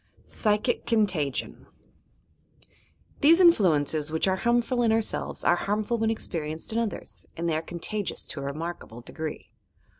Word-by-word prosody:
PSYCHIC 210 +3 0
CONTAGION 185 - 0 1.5
These 325 +4 +6
influences 160 - +4
which 160 +4 +1
are 190 0 +2
harmful 240 +3 +1
in 230 -2 +3
ourselves 225 -1 -1
are 175 - +4
harmful 210 +5 -1
when 225 0 +1
experienced 160 -5 -3
in 230 - +1
others, 230 -3 -4
and 170 +1 -2
they 165 - +1
are 155 - 0
con 170 +1 -8
tagious 210 +3 -3
to 155 - -3
a - - -5
remarkable 145 -5 -6
degree. 155 +5 -7
190 Hz, 145 wpm, -27 LUFS, 160-225 Hz, 1.5 s, These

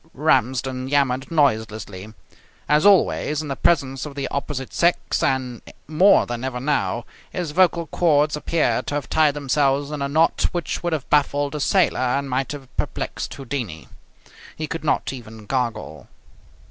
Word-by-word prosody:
Ramsden 130 -2 +1
yammered 135 -2 +1
noiselessly. 110 - -1 0.6
As 150 +5 +4
always 155 -5 +3
in 150 - -7
the 135 - -2
presence 135 -6 +1
of 150 -2 -7
the 140 -2 -3
opposite 140 -2 -4
sex, 175 +1 +1
and 125 -3 -1 0.3
more 170 +7 +5
than 120 0 -5
ever 130 -2 -3
now, 120 -5 -1 0.2
his 175 -4 -4
vocal 170 0 +3
cords 150 -2 +2
appeared 150 -6 0
to 145 - -2
have 145 - -3
tied 155 -2 +3
themselves 140 0 +1
in 150 -2 -4
a 140 - -1
knot 160 +3 +2
which 175 -4 -3
would 175 -1 -1
have 150 -5 -3
baffled 145 -1 +2
a 150 - -3
sailor 185 +6 +2
and 135 +2 0
might 130 +1 -1
have 140 -3 -9
perplexed - - -3
Houdini. 120 - -5 0.7
He 155 - -4
could 165 0 -5
not 150 - 0
even 110 -4 -10
gargle. 110 - -3
140 Hz, 160 wpm, -22 LUFS, 125-150 Hz, 0.7 s, more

